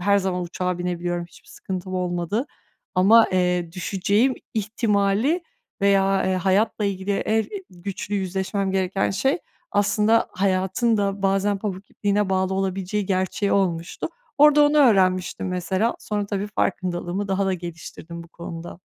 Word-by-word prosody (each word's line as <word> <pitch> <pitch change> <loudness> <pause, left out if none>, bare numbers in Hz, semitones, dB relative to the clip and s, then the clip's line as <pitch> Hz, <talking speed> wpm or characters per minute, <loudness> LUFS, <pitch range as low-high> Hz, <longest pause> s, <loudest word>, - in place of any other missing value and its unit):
her 200 +2 +3
zaman 185 -2 -1
uçağa 180 +1 -3
binebiliyorum, 175 -1 -2
hiçbir - - -20
sıkıntım 185 0 -6
olmadı 180 - -1 0.5
ama, 210 +5 +6
eee, 180 -2 +1
düşeceğim 200 +7 +1 0.2
ihtimali 215 - +1 0.4
veya, 195 -1 +3
eee, 190 - +1
hayatla 195 +4 +1
ilgili 200 0 -1
en 220 +2 +1 0.3
güçlü 190 +3 -5
yüzleşmem 190 +1 -1
gereken 190 0 0
şey 270 - +1 0.3
aslında 210 +2 +2
hayatın 190 +4 +1
da 200 -1 -1
bazen 195 +1 +1
pamuk 195 -1 -5
ipliğine 205 0 0
bağlı 190 0 +1
olabileceği 195 +1 -1
gerçeği 190 +1 0
olmuştu. 170 -4 -1 0.3
Orada 295 0 +7
onu 295 +1 +2
öğrenmiştim 190 -8 +3
mesela. 185 +5 0
Sonra 205 -1 -3
tabii 200 0 -2
farkındalığımı 180 +1 -1
daha 195 0 +1
da 190 - +1
geliştirdim 170 -1 -8
bu 170 - -15
konuda. 170 0 -8
195 Hz, 135 wpm, -23 LUFS, 180-205 Hz, 0.5 s, Orada